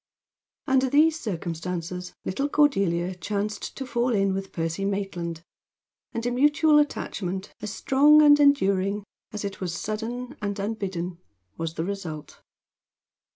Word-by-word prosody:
Under 265 -1 +3
these 310 +4 +4
circumstances 180 - -4
little 275 +10 -1
Cordelia 195 - +2
chanced 205 +4 -4
to 270 - -4
fall 240 -1 0
in 195 -1 +2
with 195 0 -4
Percy 165 +3 -2
Maitland, 180 -5 -3 0.7
and 230 0 -4
a 245 - +1
mutual 295 +4 +4
attachment, 195 -9 -2
as 210 -1 -4
strong 290 +6 +5
and 290 0 +7
enduring 200 -8 +3 0.3
as 210 -1 -5
it 200 -1 -6
was 175 -2 -2
sudden 240 +5 -4
and 205 -1 -2
unbidden, 195 -4 -3 0.4
was 165 0 -4
the 160 - -2
result. 175 -6 -6
200 Hz, 130 wpm, -26 LUFS, 180-255 Hz, 0.7 s, and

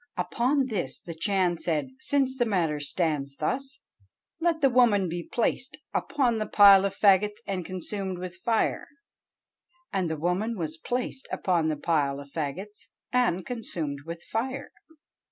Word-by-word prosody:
Upon 245 +10 +1
this 190 - -3
the 170 - -8
Chan 175 0 +1
said, 150 -6 -1
'Since 265 -2 0
the 240 - +4
matter 170 -8 0
stands 145 -2 -1
thus, 270 - -3 0.6
let 335 -1 +1
the 275 - +5
woman 225 -6 +4
be 175 +1 -3
placed 255 +5 -1 0.2
upon 250 -6 +1
the 215 - -2
pile 200 -1 +8
of 195 0 -2
fagots 205 +1 +4
and 190 -2 -2
consumed 185 +1 -4
with 180 -1 -7
fire.' 230 -2 +1 1.1
And 185 -4 0
the 160 - -2
woman 185 +8 -1
was 160 -2 -4
placed 250 +8 -3
upon 170 -4 +1
the 155 - -1
pile 145 -3 0
of 140 0 -11
fagots 175 +8 -5 0.3
and 215 -8 +2
consumed 165 - -4
with 170 0 -6
fire." 260 +5 -3
190 Hz, 150 wpm, -27 LUFS, 165-235 Hz, 1.1 s, pile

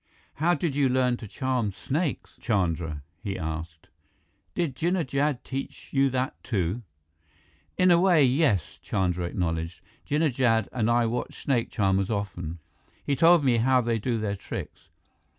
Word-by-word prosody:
How 175 +4 +3
did 150 -2 -2
you 140 -2 +3
learn 125 -1 +2
to 110 - -9
charm 125 -1 -1
snakes, 145 - -3
Chandra?" 85 - -1 0.2
he 100 -2 -3
asked. 80 -1 -5 0.7
"Did 165 -7 -1
Jinnah 175 +3 0
Jad 140 0 0
teach 135 0 -6
you 135 0 +3
that, 130 0 -2
too?" 100 0 -1 1.0
"In 185 -1 +5
a 170 - +6
way, 175 -6 +5
yes," 125 - +1
Chandra 90 -2 -1
acknowledged. 85 -1 -2 0.3
"Jinnah 150 -1 +2
Jad 115 -4 +2
and 115 -3 0
I 120 0 +3
watched 120 +2 -3
snake 125 -5 +1
charmers 95 -3 +1
often. 90 -6 -3 0.5
He 140 - +1
told 165 +1 +5
me 125 -3 +4
how 130 +3 +4
they 115 -2 0
do 115 +2 -1
their 105 -2 -2
tricks." 95 - -8
120 Hz, 150 wpm, -27 LUFS, 95-140 Hz, 1.0 s, a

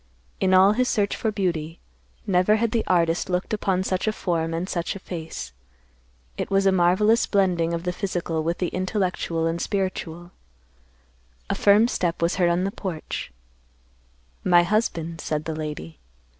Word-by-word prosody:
In 190 - +2
all 190 +2 +7
his 250 +3 +1
search 205 -3 +1
for 220 - -1
beauty, 170 -5 -2 0.5
never 185 +2 +3
had 225 0 0
the 230 -1 +1
artist 170 -1 +2
looked 180 +3 -1
upon 190 -3 0
such 185 +2 -1
a - - +3
form 165 -5 -1
and 165 +3 -2
such 170 -1 -2
a - - -6
face. 160 - -7 0.8
It - - -3
was 195 0 +2
a 195 - +5
marvelous 190 +5 +3
blending 180 -5 +2
of 170 0 -3
the 180 0 -2
physical 175 -4 -2
with 170 +2 -1
the 180 - -1
intellectual 185 -3 -1
and 165 +1 -1
spiritual. 175 -3 -3 1.2
A - - +2
firm 210 +3 +5
step 175 -7 -1
was 170 +2 0
heard 175 -2 +3
on 175 +1 +1
the 195 - -1
porch. 180 - -5 1.1
"My 175 -1 +5
husband," 170 -5 -1
said 150 0 -2
the 160 - -3
lady. 150 - -6
180 Hz, 165 wpm, -24 LUFS, 165-195 Hz, 1.2 s, all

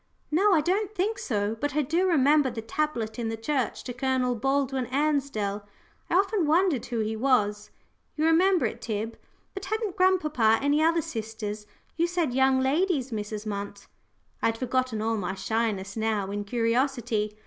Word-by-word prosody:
"No, 390 +7 +4
I 330 -5 +5
don't 400 +6 -1
think 425 +5 0
so. 210 - -1
But 285 +5 -3
I 300 - +2
do 335 +7 +1
remember 295 -3 +4
the 225 -2 -6
tablet 235 -3 -2
in 230 -1 -2
the 225 - -3
church 255 +2 -2
to 245 - -5
Colonel 255 0 0
Baldwin 270 +1 0
Ansdell. 270 -8 -1 0.5
I - - +1
often 390 -3 +2
wondered 315 - +2
who 235 -2 -1
he 220 +1 -2
was. 210 -4 +1 0.5
You 310 - +1
remember 350 +2 +4
it, - - -4
Tib? 220 0 -3 0.4
But 390 -1 -6
hadn't 435 -2 -2
grandpapa 305 - +3
any 290 +2 +2
other 330 0 +3
sisters? 215 -2 -5 0.3
You 340 +1 +2
said 345 -7 -1
young 265 0 +3
ladies, 280 -1 +1
Mrs. 210 0 -4
Munt." 200 -1 -5 0.6
I - - +3
had 225 0 -1
forgotten 255 -3 -1
all 225 0 0
my 190 -1 -3
shyness 200 -1 -2
now 215 -3 -1
in 205 0 -3
curiosity. 230 -2 0
255 Hz, 170 wpm, -27 LUFS, 220-310 Hz, 0.6 s, I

